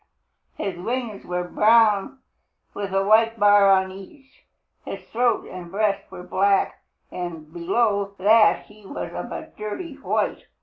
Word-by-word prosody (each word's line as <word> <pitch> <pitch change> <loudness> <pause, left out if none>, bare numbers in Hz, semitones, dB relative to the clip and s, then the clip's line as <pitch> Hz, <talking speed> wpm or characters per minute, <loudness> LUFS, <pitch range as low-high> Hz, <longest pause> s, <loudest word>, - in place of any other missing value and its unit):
His 195 -3 -4
wings 235 0 -4
were 180 0 -2
brown 215 +5 +3 0.6
with 200 -1 -5
a 195 0 +1
white 225 +2 +3
bar 205 -1 +6
on 190 -1 +3
each. 265 +9 -15 0.4
His - - -7
throat 240 +1 0
and 180 -2 -9
breast 200 +1 -1
were 180 - -9
black, 195 +2 +1 0.3
and 165 -3 -7
below 200 +3 0
that 215 +3 +4
he 210 0 -18
was 195 - -6
of - - -6
a - - -7
dirty 250 - -6
white. 280 - -2
200 Hz, 140 wpm, -23 LUFS, 190-225 Hz, 0.6 s, bar